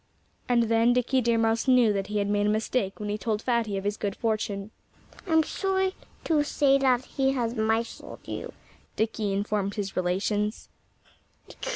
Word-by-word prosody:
And 240 -1 +4
then 230 +1 +3
Dickie 250 +1 +2
Deer 235 -1 +2
Mouse 225 +2 +1
knew 250 -4 +5
that 195 -1 -2
he 210 +1 -2
had 200 -1 +1
made 205 0 +1
a - - +3
mistake 215 -1 -1
when 210 -1 -4
he 210 +1 -2
told 215 +1 -1
Fatty 230 -5 0
of 195 - -4
his 205 +1 -1
good 200 -1 -3
fortune. 215 -2 -2 0.6
"I'm 320 -2 +4
sorry 380 +2 0 0.3
to 310 -3 +2
say 280 -2 +3
that 260 -2 +2
he 270 -1 0
has 235 -3 -1
misled 225 0 -2
you," - - -5 0.4
Dickie 220 -2 -1
informed 200 0 -1
his 200 -2 -4
relations. 205 +4 -1
225 Hz, 170 wpm, -27 LUFS, 205-250 Hz, 0.6 s, knew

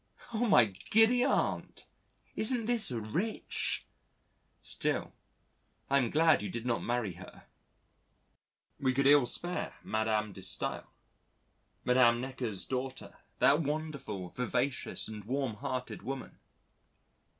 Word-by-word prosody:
Oh 230 +2 +1
my 160 - +6
giddy 225 - +3
Aunt! - - -1 0.5
Isn't 230 +1 +2
this 235 -2 +6
rich? 125 - -2 0.8
Still, - - -2 0.8
I 140 - +5
am 125 -4 0
glad 160 0 +4
you 105 - -4
did 115 +4 -5
not 120 -2 0
marry 120 -4 -1
her: 90 +2 -13 1.4
we 130 -3 +1
could 135 +1 +2
ill 140 -2 +6
spare 175 +7 -3
Madam 110 -1 -1
de 95 - -10
Staël, - - -3 1.0
Madam 125 -2 +5
Necker's 120 -7 -4
daughter, 130 0 -5 0.2
that 145 +2 +5
wonderful, 140 - -4
vivacious 125 +2 -2
and 105 -1 -8
warmhearted 130 -1 -3
woman. 130 +5 -6
130 Hz, 110 wpm, -31 LUFS, 110-150 Hz, 1.4 s, my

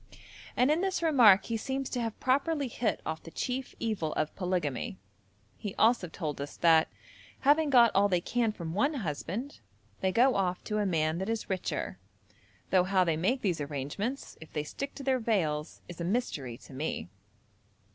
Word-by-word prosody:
And 255 +4 +4
in 315 +3 +2
this 380 -2 -1
remark 240 - +6
he 230 - -2
seems 270 +3 -3
to 245 - -1
have 225 -2 -4
properly 280 +2 +1
hit 230 -1 -2
off 160 0 -3
the - - -10
chief 255 +8 -4
evil 210 -9 -1
of 155 - -2
polygamy. 175 - -2 0.6
He 205 -3 -5
also 225 -4 +3
told 155 -4 -4
us 145 - -6
that, 165 -2 +5 0.5
having 295 +2 +4
got 240 -4 +6
all 200 +1 +4
they 180 -2 +2
can 230 +5 0
from 170 -6 -6
one 280 - +1
husband, 200 - -4 0.4
they 190 - +1
go 250 +6 +4
off 185 -2 -1
to 215 0 -2
a 205 - +1
man 160 -2 +1
that 190 +3 -3
is 225 -3 -2
richer, 185 -1 -3 0.7
though 185 -1 +4
how 190 0 +3
they 165 -3 +1
make 240 +12 0
these 175 -6 0
arrangements, 145 - -4
if 160 - -11
they 150 - -2
stick 275 - -6
to 280 - -7
their 260 -1 +2
veils, 165 -10 -1
is 175 -1 -8
a - - -1
mystery 170 - -2
to - - -15
me. 140 - -3
200 Hz, 185 wpm, -30 LUFS, 165-250 Hz, 0.7 s, remark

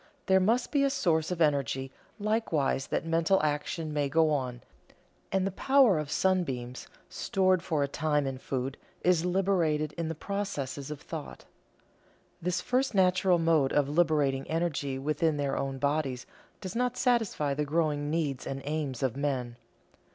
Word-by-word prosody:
There 190 -1 +4
must 230 +6 +1
be 285 -2 +3
a 275 - +3
source 165 - +1
of 180 -2 -3
energy 135 -3 +1 0.3
likewise 205 -11 0
that - - -2
mental 165 +3 +2
action 150 +1 -2
may 145 -2 0
go 160 +1 +3
on, 125 -4 -2 0.7
and 190 -1 +1
the 195 - -1
power 255 - +4
of 150 -2 -4
sunbeams, 135 -10 -1 0.2
stored 185 -2 +1
for 155 -5 0
a - - 0
time 150 0 0
in 135 -1 -4
food, 135 +1 -3 0.3
is 175 -2 +3
liberated 175 -5 +1
in 165 - -1
the 160 - -3
processes 150 -8 -4
of 150 -2 -6
thought. - - -8 1.0
This 180 +1 -1
first 255 +1 0
natural 185 -1 +4
mode 165 -5 +2
of 145 -1 +2
liberating 150 -4 +1
energy 155 -5 -1
within 150 +3 0
their 140 -1 -1
own 135 -1 -2
bodies 140 -3 -1 0.4
does 185 +1 -6
not 250 +1 0
satisfy 225 - +1
the 150 +2 -1
growing 150 -1 0
needs 150 -5 -2
and 135 0 -4
aims 145 -4 -3
of 130 -3 0
men. 130 -4 -2
155 Hz, 160 wpm, -29 LUFS, 140-185 Hz, 1.0 s, There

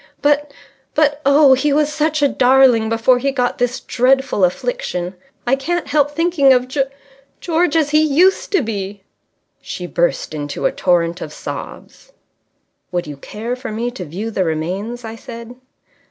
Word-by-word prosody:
But 290 0 +2 0.4
but 295 -1 +2
oh, 280 -1 +6
he 285 +3 +1
was 300 +1 +1
such 305 -1 0
a - - +6
darling 255 -4 +4
before 230 +3 +3
he 275 +2 0
got 250 -2 -1
this 245 +1 0
dreadful 260 -3 +1
affliction. 180 - -1 0.3
I 250 +2 +3
can't 340 +5 -3
help 290 -1 +2
thinking 330 -3 +3
of 250 0 +1
G 270 +1 0 0.5
George 335 -2 0
as 305 -3 +2
he 305 0 +4
used 320 +6 +3
to 375 -8 +3
be." 200 -3 -5 0.6
She 180 - -6
burst 175 -2 -1
into 145 -1 -4
a - - +3
torrent 175 -1 0
of - - -6
sobs. - - -9 0.8
"Would 175 -1 -2
you 145 -2 -8
care 225 - -5
for 255 -2 -7
me 235 +3 -2
to 220 -7 -7
view 190 +8 -5
the 195 - 0
remains?" 185 +9 -3
I 225 0 -6
said. 235 0 -10
255 Hz, 165 wpm, -18 LUFS, 205-295 Hz, 0.8 s, oh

